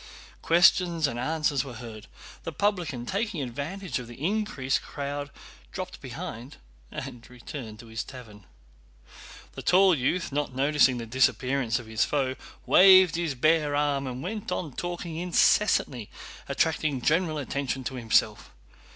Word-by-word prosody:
Questions 170 -1 +4
and 120 -4 -2
answers 150 0 0
were 130 -4 -9
heard. 110 -2 -9 0.3
The - - -5
publican, 175 -12 -1
taking 200 - -2
advantage 140 +5 -4
of 125 - -8
the 120 +1 -12
increased 195 -10 0
crowd, 145 0 -5 0.4
dropped - - -6
behind 120 +5 -7 0.3
and 120 -1 -8
returned 125 -2 -8
to - - -14
his 115 +1 -5
tavern. 110 -7 -12 1.0
The - - -8
tall 190 0 +5
youth, 170 +5 -1
not 140 -2 -2
noticing 140 -1 +3
the 115 - -5
disappearance 130 0 +1
of 120 - -7
his 110 0 0
foe, 135 -3 0 0.3
waved 185 -2 +7
his 165 -5 -2
bare 150 +2 +2
arm 145 -2 0
and 125 0 -5
went 205 +2 -5
on 160 -6 -3
talking 175 0 -5
incessantly, 170 - +2 0.4
attracting 150 -5 0
general 165 -1 +1
attention 135 -2 -3
to 130 - -4
himself. 115 -3 +1
140 Hz, 140 wpm, -27 LUFS, 125-170 Hz, 1.0 s, waved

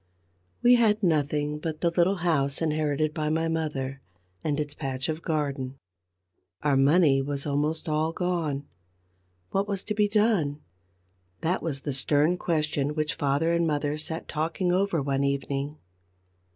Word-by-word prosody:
We 245 0 +7
had 220 -2 +3
nothing 150 -2 +1
but 155 -1 -4
the 170 - +2
little 175 +3 +3
house 140 -4 +2
inherited 155 -1 0
by 155 0 -1
my 160 +1 +1
mother, 140 -5 -2 0.4
and 150 -1 0
its 145 -1 -3
patch 135 -3 -3
of 160 +1 -2
garden. 140 -5 -2 0.9
Our 145 -2 +3
money 140 0 +4
was 140 0 -3
almost 150 +3 -1
all 155 +1 +1
gone. 165 -5 -1 0.9
What 195 +1 0
was 200 -2 -2
to 210 - -2
be 210 0 +3
done? 205 -9 +2 0.8
That 175 +3 0
was 145 -5 -2
the 145 0 -3
stern 150 +6 +2
question 150 -3 0
which 155 +1 0
father 145 +3 +1
and 170 0 +2
mother 145 -1 0
sat 160 +1 -4
talking 165 +4 -1
over 180 -4 +1
one 135 0 0
evening. 140 +1 -2
155 Hz, 150 wpm, -27 LUFS, 145-170 Hz, 0.9 s, We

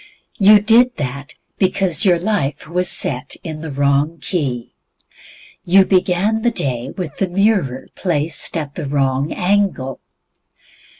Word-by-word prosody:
You 210 +1 +7
did 235 +4 +3
that 140 +1 -5 0.2
because 190 -2 +2
your 180 -3 +4
life 170 -7 -2
was 180 +2 -1
set 125 -2 -1
in 155 -4 -6
the 160 - -6
wrong 140 +3 +1
key. 135 - -3 0.9
You 190 +2 +5
began 190 +4 +1
the 240 - +2
day 130 - -3
with 170 -6 -5
the 195 - 0
mirror 180 - 0
placed 165 -1 -1
at 145 -3 -5
the 155 -3 -5
wrong 135 0 0
angle. 180 -9 0
170 Hz, 130 wpm, -18 LUFS, 140-195 Hz, 0.9 s, You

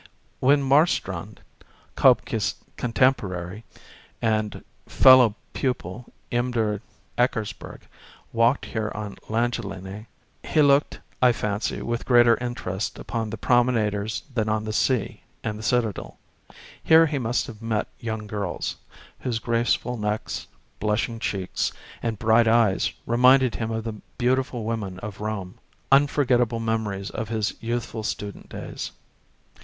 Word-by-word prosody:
When 140 +2 +4
Marstrand, 120 - +1 0.5
K0bke's 110 -5 +3 0.2
contemporary 105 -6 0 0.6
and 110 -2 -1 0.2
fellow 130 -5 +7 0.2
pupil 120 -3 -3 0.2
imder 115 -4 0 0.4
Eckersberg, 115 -4 -1 0.5
walked 115 +4 +3
here 110 -2 -3
on 105 -1 -6
Langelinie, 105 -3 -3 0.4
he 155 - +3
looked, 140 +1 +3 0.2
I 125 -1 +6
fancy 105 -2 -2
with 120 0 -3
greater 120 -2 +6
interest 115 -5 -4
upon 115 -2 -3
the - - -5
promenaders 110 -4 +1
than 110 -3 0
on 110 0 0
the 110 0 -4
sea 110 -1 0 0.2
and 105 0 -3
the - - -7
Citadel. 110 -3 -1 0.7
Here 160 +1 +7
he 145 -3 -1
must 120 0 0
have 115 -4 -10
met 115 -2 -1
35 - - -25
young 110 -2 -3
girls, 100 -4 -3 0.4
whose 120 -3 -2
graceful 120 +1 0
necks, 105 0 -3 0.3
blushing 110 +2 -1
cheeks, 95 -4 -2 0.3
and 115 -2 -2
bright 110 +2 +4
eyes 110 -4 +3
reminded 125 +1 +5
him 115 -1 -3
of 110 0 -2
the 115 -1 -4 0.2
beautiful 130 -1 0
women 105 -4 -3
of 105 -1 -7
Rome 105 -4 -4 0.3
â€" 140 +1 +6
^unforgettable 125 -5 +1
memories 110 -3 -2
of 110 -1 -4
his 110 -2 -1
youthful 115 -1 -3
student 105 -1 -5
days. - - -6
115 Hz, 125 wpm, -25 LUFS, 105-120 Hz, 0.7 s, fellow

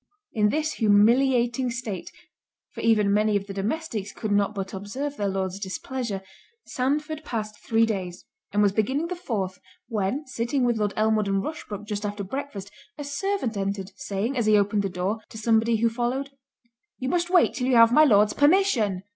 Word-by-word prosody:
In 210 -2 +3
this 310 +5 -1
humiliating 240 +4 +3
state 235 -6 -5 0.6
(for - - -7
even 210 -3 +3
many 210 0 +2
of 195 - -5
the 200 - -7
domestics 210 0 -3
could 215 - -5
not 205 +1 +2
but 195 -1 -4
observe 255 +9 -4
their 205 -5 -1
Lord's 190 0 -2
displeasure) 200 +1 -4 0.4
Sandford 300 +4 -2
passed 215 -5 -4
three 225 0 +2
days, 185 -5 -4 0.3
and 210 +1 +2
was 200 - +4
beginning 265 +11 0
the 360 - -3
fourth, 200 - -3 0.3
when 220 +6 -1
sitting 250 +1 -1
with 240 -2 +2
Lord 205 -1 0
Elmwood 215 -1 +2
and 195 0 0
Rushbrook 210 -9 -6
just 210 -1 -4
after 205 0 -3
breakfast, 205 -3 -6 0.3
a 295 - -5
servant 285 - -2
entered, 195 0 -3
saying, 200 +6 -3
as 235 -4 0
he 215 -1 +6
opened 205 0 +2
the 195 - -2
door, 185 +5 -2
to - - -10
somebody 225 +1 +2
who 230 +1 +2
followed, 245 +4 -2 0.7
"You 260 - -4
must 345 +4 0
wait 360 -1 +4
till 250 - -2
you 260 - +3
have 230 0 +7
my 305 - +7
Lord's 210 -6 +5
permission." 285 - +3
220 Hz, 180 wpm, -25 LUFS, 200-260 Hz, 0.7 s, have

